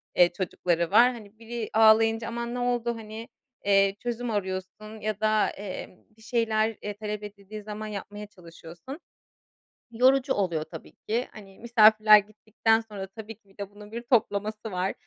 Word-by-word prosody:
eee, 175 -1 +6
çocukları 170 -2 -1
var. 240 +4 +6
Hani, 215 -1 -13
biri 230 -1 -5
ağlayınca 225 +1 +5
aman 235 +1 -4
ne 250 - -3
oldu 240 -1 0
hani, 225 +2 -9 0.4
eee, 195 0 +4
çözüm 240 -1 -3
arıyorsun 200 +2 -5
ya 215 -1 -3
da, 215 -1 +2
eee, 190 -2 -8
bir - - -21
şeyler, 225 -2 0
eee, 205 0 -4
talep 210 0 -5
edildiği 205 +1 -9
zaman 215 +1 -6
yapmaya 205 0 -7
çalışıyorsun. 170 - -12 0.9
Yorucu 255 +3 +3
oluyor 170 -6 -1
tabii 160 0 -11
ki. 235 +4 0
Hani, 195 -3 -14
misafirler 215 -2 +6
gittikten 215 +2 0
sonra 205 -4 -8
tabii 220 +2 -10
ki 200 -2 -32
bir 195 - -24
de 200 -1 -6
bunun 205 +1 -14
bir 235 +1 -5
toplaması 215 -2 0
var. 185 +1 -1
215 Hz, 160 wpm, -27 LUFS, 200-225 Hz, 0.9 s, eee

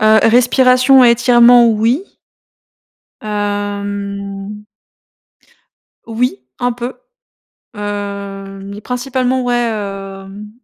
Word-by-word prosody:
Heu, 215 0 +5
respiration 250 +2 +4
et 235 - +6
étirements, 240 0 +5
oui. 230 - +1 1.2
Hem. 205 0 -4 1.4
Oui, 230 - -2
un 245 0 0
peu. 245 - -7 0.8
Heu, 200 -1 -6
mais, 200 +1 -8
principalement, 255 +1 -2
ouais, 245 0 0
hem, 200 -3 -5
215 Hz, 80 wpm, -15 LUFS, 200-245 Hz, 1.4 s, et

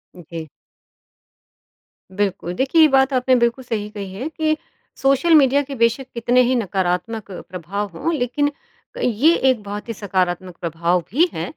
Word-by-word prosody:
जी। 165 -2 -8 1.7
बिल्कुल। 190 -3 -1
देखिए, 270 - +2
ये 310 - +8
बात 265 +1 +3
आपने 255 0 +3
बिल्कुल 235 +2 0
सही 215 -4 -3
कही 200 -3 -7
है 240 +9 -4
कि 310 -1 0 0.5
सोशल 275 +5 +3
मीडिया 280 -1 +5
के 280 - -6
बेशक 235 +2 +1
कितने 240 +2 +3
ही 260 - +2
नकारात्मक 195 0 -2
प्रभाव 185 +3 -5
हों 335 - -1
लेकिन 290 +1 0 0.5
अ, - - -6
ये 250 +8 +3 0.2
एक 240 -5 +1
बहुत 205 +2 -6
ही 230 - -3
सकारात्मक 185 -3 -2
प्रभाव 170 +2 0
भी 330 +8 +3
है। - - -3
230 Hz, 155 wpm, -21 LUFS, 185-265 Hz, 1.7 s, ये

